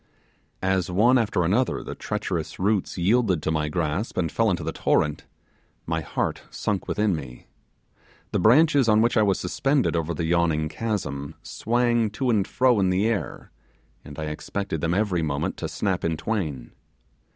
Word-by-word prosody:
As 95 -2 +1
one 115 +8 +4
after 100 -5 0
another 110 +9 +1
the - - -6
treacherous 80 -2 -4
roots 100 0 0
yielded 95 -2 +2
to 80 - 0
my 75 -1 0
grasp, 85 +6 -2
and 85 -4 0
fell 115 -1 +2
into 85 -4 -1
the 80 - -2
torrent, 75 -2 0 0.6
my 80 0 -1
heart - - -2
sunk 100 -3 -3
within 105 -3 +1
me. 70 -5 -9 0.9
The - - 0
branches 140 - +5
on 110 0 +5
which 120 - +1
I 110 - +4
was 100 -3 +2
suspended 135 +6 0
over 85 0 -1
the 85 - -2
yawning 80 -2 +1
chasm 80 -11 -3
swang 120 -1 +1
to 130 -2 +1
and 100 -4 +1
fro 125 -3 +3
in 95 -1 +2
the 95 +3 +1
air, 105 - -3 0.5
and 75 - -11
I 80 - -4
expected 80 +2 -4
them 85 +1 0
every 100 -4 +1
moment 70 -3 -2
to - - -3
snap - - -2
in 80 -1 0
twain. 75 - -3
95 Hz, 170 wpm, -25 LUFS, 80-110 Hz, 0.9 s, branches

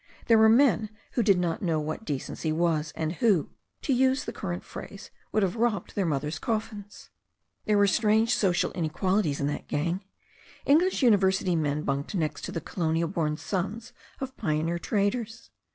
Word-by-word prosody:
There 230 - +5
were 220 0 +7
men 225 -3 +4 0.2
who 240 - +1
did 200 -4 +4
not 175 -2 -1
know 165 -4 0
what 155 +8 -4
decency 150 +1 -3
was, 155 -1 0
and 160 0 -2
who, 200 -10 +2 0.3
to 275 - +1
use 260 +1 +2
the - - -5
current 175 -2 -4
phrase, 200 - -10 0.2
would 215 - +2
have 190 +2 0
robbed 230 -2 0
their 195 -4 0
mother's 150 0 -2
coffins. 215 -2 -5 0.5
There 210 -1 +3
were 205 - +5
strange 220 +3 +3
social 185 -4 +1
inequalities 175 -1 0
in 140 - 0
that 145 - -3
gang. 170 +6 -1 0.6
Eng 290 +3 +6
lish 365 -4 0
university 190 -5 +3
men 150 -1 0
bunked 140 +7 -2
next 155 -4 -1
to - - -5
the - - -3
colonial 165 0 -1
born 155 -4 -1
sons 205 +6 -4 0.3
of 265 0 -5
pioneer 165 -1 -1
traders. 215 +4 -2
190 Hz, 170 wpm, -27 LUFS, 160-220 Hz, 0.6 s, were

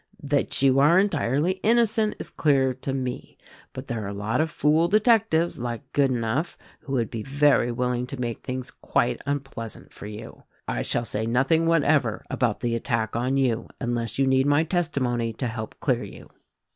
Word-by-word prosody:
That 140 -1 0
you 135 0 +5
are 150 +5 +5
entirely 175 - +1
innocent 225 -1 +2
is - - -5
clear 135 -4 +2
to 130 +2 -5
me; 130 -2 -4 0.3
but 130 - -8
there 115 -5 -4
are - - -4
a 100 - -4
lot 105 +7 0
of 160 - 0
fool 155 +3 +2
detectives, 210 - +3
like 120 -1 -5
Good 140 -2 +3
enough, 125 +6 -1 0.2
who 140 - -7
would 120 -4 0
be 115 - -4
very 140 -1 +2
willing 125 +1 -1
to 140 0 -7
make 120 -2 -3
things 130 +1 -5
quite 120 - -1
unpleasant 135 -5 -5
for - - -9
you. 105 +2 -9 0.3
I - - -1
shall 120 - -1
say 110 +1 -2
nothing 135 +8 +2
whatever 145 -8 +2
about 120 -4 0
the 120 -1 -1
attack 115 -2 -1
on 125 +3 0
you 125 -4 0
unless 120 -2 -2
you 135 - +3
need 130 +1 +3
my 145 +2 +4
testimony 135 -9 -1
to 125 - -4
help 110 -2 -5
clear - - +1
you." - - -11
130 Hz, 185 wpm, -25 LUFS, 120-150 Hz, 0.3 s, you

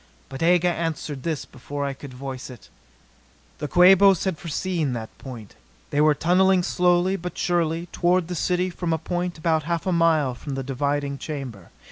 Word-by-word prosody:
But 135 +2 -8
Aga 175 +1 +4
answered 160 -4 -2
this 160 -2 -3
before 140 +2 -6
I 140 - -2
could 135 0 -10
voice 130 0 -7
it. 125 - -13 0.9
The 150 - -3
Quabos 190 +2 +6
had 190 -5 -2
foreseen 165 -3 -2
that 110 -2 -6
point. 120 -6 -9 0.4
They 145 - +2
were 150 0 +4
tunneling 185 +3 +3
slowly 180 +2 +2
but 180 -1 -6
surely 170 -1 0
toward 175 -1 +1
the 180 - -4
city 180 +2 0
from 170 -1 -2
a - - +1
point 175 +2 -3
about 160 0 +1
half 170 +1 -2
a 185 - +1
mile 160 -6 +3
from 135 +3 -6
the 135 - -3
diving 140 +1 -2
chamber. 130 - -7
165 Hz, 175 wpm, -24 LUFS, 140-175 Hz, 0.9 s, Quabos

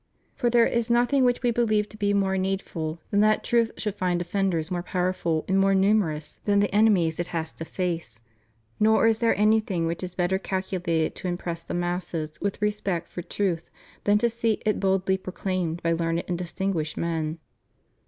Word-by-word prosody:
For 240 - 0
there 235 -1 +5
is 235 0 0
nothing 245 +3 +3
which 245 0 +2
We 240 - +3
believe 215 -3 +1
to - - -13
be 205 -1 0
more 195 -1 +1
needful 185 -4 -2
than 205 - +3
that 215 +1 +3
truth 235 -1 +2
should 210 -3 -2
find 180 -3 0
defenders 175 -2 -1
more 175 -1 -1
powerful 180 -3 -1
and 195 0 +2
more 195 0 +4
numerous 190 -7 +1
than 205 -1 +3
the 200 -2 +1
enemies 195 -7 +3
it 175 - -1
has 165 -2 -3
to 160 - -8
face; 165 -11 -3 0.6
nor 220 +1 +4
is 225 -1 +3
there 230 -1 +3
anything 210 -5 +2
which 165 +1 -2
is 180 -1 -6
better 185 +1 +1
calculated 180 -4 -1
to - - -4
impress 175 -1 -3
the 165 - -5
masses 175 -3 -3
with 200 +1 -2
respect 200 -5 -1
for 175 - -6
truth 175 -1 -2 0.4
than 205 0 +5
to 235 - +2
see 230 -1 0
it 215 - +1
boklly 190 0 +1
proclaimed 185 -3 -3
by 165 - +2
learned 165 0 0
and 175 -1 -2
dis 175 -1 -5
tinguished 185 -6 -2
men. 160 -1 -2
190 Hz, 190 wpm, -26 LUFS, 170-210 Hz, 0.6 s, there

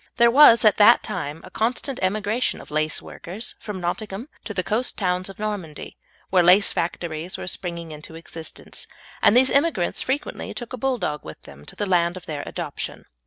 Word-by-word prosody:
There 235 0 +6
was 240 -4 +8
at 215 - +5
that 220 +3 +7
time 150 +3 -4
a - - -12
constant 245 +4 -1
emigration 210 +5 0
of - - -12
laceworkers 155 +6 -3
from 210 -3 -6
Nottingham 200 - -4 0.2
to - - -5
the 185 - 0
coast 230 +7 0
towns 185 -1 0
of 195 - -10
Normandy, 205 -8 -5 0.4
where 185 -2 +5
lace 180 +4 +5
factories 170 0 -3
were - - -6
springing 170 -2 -4
into 155 +1 -9
existence, 165 0 -7 0.3
and 225 - +6
these 260 +1 +6
immigrants 280 - +2
frequently 270 +3 -3
took 240 0 -7
a - - -4
Bulldog 245 - -1
with 80 - -10
them 70 +1 -14
to - - -9
the 205 - -2
land 175 -2 +2
of 180 - -11
their 150 -4 -4
adoption. - - -5
190 Hz, 180 wpm, -23 LUFS, 170-230 Hz, 0.4 s, was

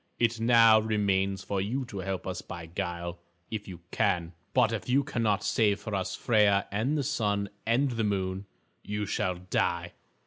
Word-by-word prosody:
It 115 -1 +1
now 115 -1 +6
remains 100 -3 0
for 95 0 -1
you 125 +7 -2
to 100 -5 -7
help 95 0 -3
us 95 0 -4
by 85 -1 -8
guile, 85 +1 -4 0.3
if 105 -2 -4
you 90 -3 -9
can. 90 -5 0 0.2
But 125 -4 +3
if 115 - -4
you 135 +3 +4
cannot 115 -7 0
save 105 -3 +2
for 110 - -6
us 95 -2 -1
Freia 105 -4 +3
and 120 +9 0
the 145 - 0
Sun 105 -7 0 0.2
and 125 +2 +2
Moon, 95 0 -2 0.4
you 105 0 -3
shall 90 -2 -1
die. 85 -1 -1
100 Hz, 170 wpm, -29 LUFS, 95-115 Hz, 0.4 s, now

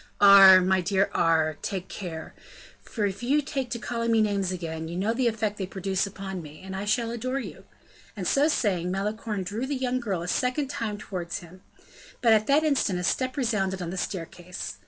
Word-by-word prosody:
"Aure, 195 -2 +9
my 190 +1 +2
dear 195 +2 +1
Aure, 160 -2 +2
take 190 -2 -4
care! 165 -5 -7 0.6
if 200 -2 -1
you 270 +5 +2
take 270 -3 -3
to 235 - -3
calling 235 0 -2
me 225 - +4
names 200 -3 +1
again, 160 -3 -5
you 170 +2 -5
know 205 +5 0
the 245 +1 +1
effect 215 -2 -1
they 190 - -3
produce 190 +1 -1
upon 190 -2 -6
me, 150 -1 -11
and 190 0 -7
I 195 +2 -4
shall 230 +2 0
adore 255 +3 -3
you." 275 - -7 0.5
And 185 -3 -3
so 285 +2 +3
saying, 190 - 0
Malicorne 210 +1 -3
drew 215 +8 -4
the 285 - -2
young 255 -1 -1
girl 195 -8 -3
a - - -6
second 255 - 0
time 215 -5 -3
towards 180 -4 -5
him. 180 +2 -14 0.6
But 230 -2 +5
at 215 0 +2
that 290 +3 +4
instant 280 - +1
a 180 - -3
step 255 +8 0
resounded 205 -7 0
on 175 -2 -4
the - - -5
staircase. 170 - -5
200 Hz, 200 wpm, -26 LUFS, 180-235 Hz, 0.6 s, Aure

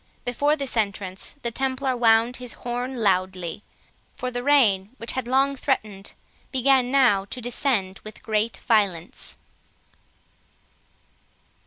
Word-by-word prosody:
Before 285 +5 +1
this 275 -4 0
entrance 200 -3 -2
the 235 - -1
Templar 265 +1 -1
wound 230 +1 +3
his 250 -2 -6
horn 245 +1 -4
loudly; 185 -2 0 0.5
for 255 - -4
the 245 0 -3
rain, 230 -9 +3
which 230 - -2
had 260 -2 -3
long 270 +2 +2
threatened, 210 -8 -2 0.4
began 260 -1 +3
now 250 -8 +4
to 250 - -7
descend 235 -5 0
with 215 - -11
great 220 +1 0
violence. 195 -7 0
240 Hz, 120 wpm, -24 LUFS, 200-260 Hz, 0.5 s, now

